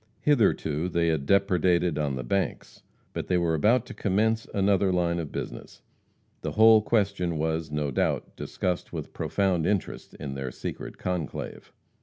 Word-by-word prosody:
Hitherto 90 - +2
they 85 -1 +1
had 75 -4 -1
depredated 90 -4 +2
on 70 -3 -1
the 65 - -4
banks. 95 +10 -2 0.3
But - - -4
they 90 - +2
were 85 -2 +1
about 115 +10 +3
to - - -9
commence 110 +3 0
another 100 -1 +2
line 85 -1 +1
of 80 -4 -5
business. - - -7 0.6
The - - -4
whole 110 0 +7
question 100 -6 0
was, 80 0 -1
no 75 -1 -2
doubt, - - -1
discussed 90 -1 -3
with - - -6
profound 95 -5 0
interest 100 -3 -2
in 70 -2 -6
their 65 -1 -4
secret - - -7
conclave. 90 -5 -4
90 Hz, 155 wpm, -27 LUFS, 80-100 Hz, 0.6 s, whole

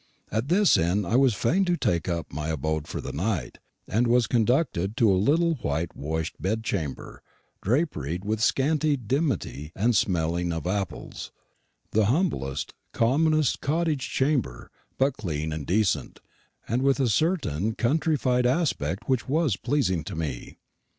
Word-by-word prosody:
At 110 +5 -1
this 190 +4 +4
inn 90 +5 +1
I 100 - 0
was 130 -4 +4
fain 175 - +2
to 175 -1 +1
take 85 - 0
up 85 -4 -3
my 75 +2 -3
abode 80 0 -2
for - - -5
the - - -5
night, 85 - -2 0.3
and 120 +4 +1
was 120 0 +4
conducted 115 - +1
to 110 -4 +4
a - - +4
little 165 +6 +3
whitewashed 80 - -3
bedchamber, 95 -7 -3 0.4
draperied 95 - -1
with 110 +1 -1
scanty 145 +5 +2
dimity 125 - -2
and 115 +4 +2
smelling 85 -2 +1
of 80 -1 -4
apples 95 -3 -4 0.6
the 110 0 +3
humblest, 110 - -1 0.2
commonest 155 +4 +2
cottage 155 -2 0
chamber, 130 - -1 0.3
but 135 0 +1
clean 80 -6 -3
and 75 -3 -5
decent, 100 0 0 0.5
and 120 +4 0
with 135 +1 +2
a 130 - +2
certain 110 - 0
countrified 130 -2 +1
aspect 120 - -1
which 130 -2 0
was 150 - +2
pleasing 120 - 0
to - - -6
me. 75 -6 -5
110 Hz, 145 wpm, -26 LUFS, 85-140 Hz, 0.6 s, this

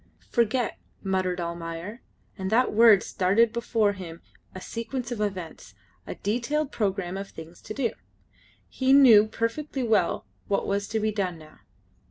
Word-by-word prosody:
"Forget!" 240 0 0 0.2
muttered 185 -2 -1
Almayer, 170 +5 -5 0.3
and 190 -2 -4
that 235 +3 +2
word 220 -2 +6
started 210 +5 +2
before 225 -3 +1
him 170 -4 -9 0.3
a - - -5
sequence 235 +4 -5
of 230 -3 -3
events, 180 - -5 0.3
a - - -5
detailed 260 +8 -1
programme 195 -3 -2
of 195 0 -6
things 165 +1 -12
to - - -7
do. 245 -5 0 0.8
He 260 0 +1
knew 235 -7 +8
perfectly 255 +5 -3
well 225 -3 +1 0.2
what 200 - 0
was 200 0 -1
to 220 - -1
be 215 0 0
done 190 -5 -2
now. 155 -1 -16
210 Hz, 150 wpm, -26 LUFS, 185-235 Hz, 0.8 s, knew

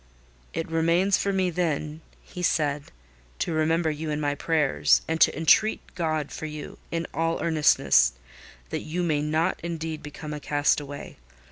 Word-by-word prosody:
"It 165 - -3
remains 170 +4 +2
for 200 - 0
me, 190 -2 +1
then," 155 -2 -2 0.2
he 180 - -9
said, 150 -4 +1 0.5
"to 165 - -2
remember 160 +1 +1
you 155 +1 -5
in 150 0 -1
my 145 -1 0
prayers, 150 -1 +2
and 160 0 -2
to - - +5
entreat 190 +7 +3
God 155 -4 -2
for 155 - -5
you, 150 -1 -8
in 165 0 -2
all 165 0 0
earnestness, 145 - +4 0.6
that - - -2
you 175 +3 -3
may 155 -4 +1
not 155 +2 0
indeed 165 -2 -4
become 150 +1 -7
a 150 - -5
castaway. 145 -1 -1
160 Hz, 155 wpm, -26 LUFS, 150-165 Hz, 0.6 s, to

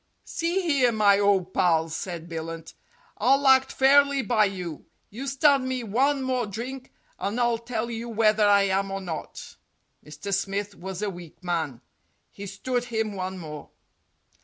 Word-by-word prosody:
"See 340 +3 -1
here, 275 -7 +3
my 205 -3 +4
ole 200 -3 +3
pal," 165 -3 +2
said 170 +1 -5
Billunt, 165 0 -6 0.5
"I'll 270 +5 +3
act 265 0 +5
fairly 280 0 +4
by 215 0 +3
you. 180 -6 -6 0.2
You 255 +7 -6
stand 275 -1 +3
me 255 -1 -2
one 265 +6 +1
more 255 -3 -1
drink, 250 +6 -7 0.3
and 205 +5 -2
I'll 235 -1 +2
tell 235 0 -4
you 230 +1 -5
whether 215 -1 +3
I 200 -1 +5
am 195 0 0
or 195 0 -3
not." 175 -5 -7 0.5
Mr. 195 +6 -6
Smith 200 +1 -2
was 190 +2 -6
a 205 - -1
weak 175 0 -12
man. 160 -8 -2 0.5
He 200 0 -8
stood 245 +6 -2
him 220 -3 -2
one 190 0 -4
more. 150 -4 -8
205 Hz, 160 wpm, -26 LUFS, 185-255 Hz, 0.5 s, act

